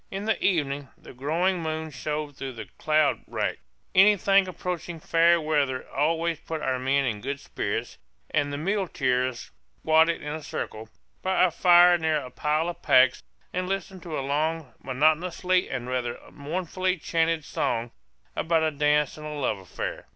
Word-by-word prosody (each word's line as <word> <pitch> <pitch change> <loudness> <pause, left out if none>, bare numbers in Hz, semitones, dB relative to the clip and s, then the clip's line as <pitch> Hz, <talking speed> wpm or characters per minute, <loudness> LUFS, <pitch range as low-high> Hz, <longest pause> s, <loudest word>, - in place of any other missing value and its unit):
In 195 +2 -5
the 220 - 0
evening 145 -6 0
the - - -13
growing 170 +8 0
moon 160 0 -3
shone 150 +2 -4
through 135 -1 -6
the 110 -2 -7
cloud 155 -1 +2
rack. - - -2 0.3
Anything 195 0 +5
approaching 175 -1 -5
fair 170 +2 +4
weather 145 -5 0
always 165 +3 0
put 160 -1 -5
our 130 -1 0
men 135 +2 +1
in 110 -4 -2
good 140 +4 -4
spirits; - - -4 0.3
and 145 -2 +1
the 145 - -3
muleteers 135 - -1 0.3
squatted 160 - +3
in 150 0 -4
a 160 - -5
circle, 110 -6 -6 0.3
by 190 0 +2
a 185 - +4
fire 175 +1 +6
near 160 -1 +1
a 130 -4 -6
pile 150 +5 0
of 175 - -5
packs, 130 0 +5 0.3
and 180 0 -2
listened 195 -1 -4
to 165 -3 -5
a 135 - -3
long 155 +1 -1
monotonously 160 +7 +1
and 125 -2 -4
rather 125 -2 -2
mournfully 185 +5 -2
chanted 165 -1 0
song 115 0 -2 0.4
about 165 -1 +1
a 160 - +2
dance 150 0 +1
and 155 - -7
a 150 - -5
love 135 -8 -1
affair. 95 - -6
155 Hz, 165 wpm, -26 LUFS, 140-175 Hz, 0.4 s, fire